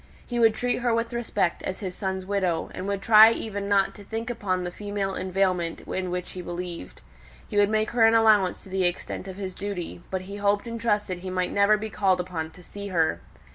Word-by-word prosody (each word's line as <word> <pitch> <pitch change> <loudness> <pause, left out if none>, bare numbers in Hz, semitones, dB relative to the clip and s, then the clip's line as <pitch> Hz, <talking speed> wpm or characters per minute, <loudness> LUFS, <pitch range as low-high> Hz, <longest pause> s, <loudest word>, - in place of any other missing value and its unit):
He 240 -1 -3
would 225 -2 +5
treat 245 0 0
her 240 -2 +1
with 230 +1 -2
respect 225 -7 -1
as 190 - -4
his 185 -3 -4
son's 190 0 -3
widow, 185 -4 -1
and 185 - -5
would 200 -1 -2
try 220 0 +9
even 200 -3 -4
not 200 -1 +3
to 205 - -12
think 225 +3 -4
upon 190 -6 -1
the 175 - -4
female 205 0 -3
inveiglement 185 -3 0
in 185 -1 -3
which 180 0 -4
he 185 - -6
believed. 175 - -6 0.5
He - - -4
would 205 0 +5
make 215 0 +1
her 230 -2 +5
an 225 - +4
allowance 215 -5 +4
to - - -13
the 190 0 0
extent 175 +2 -3
of 190 - -7
his 190 -2 -5
duty: 185 -3 -5
but 190 -1 -2
he 200 +2 -8
hoped 205 +1 +1
and 230 -1 -5
trusted 210 -5 0
he 185 +1 -6
might 185 -1 -1
never 200 +1 +4
be 215 0 -5
called 190 -3 +2
upon 175 -3 -3
to 180 +2 -16
see 200 +3 -8
her. 160 - +1
195 Hz, 225 wpm, -26 LUFS, 185-215 Hz, 0.5 s, try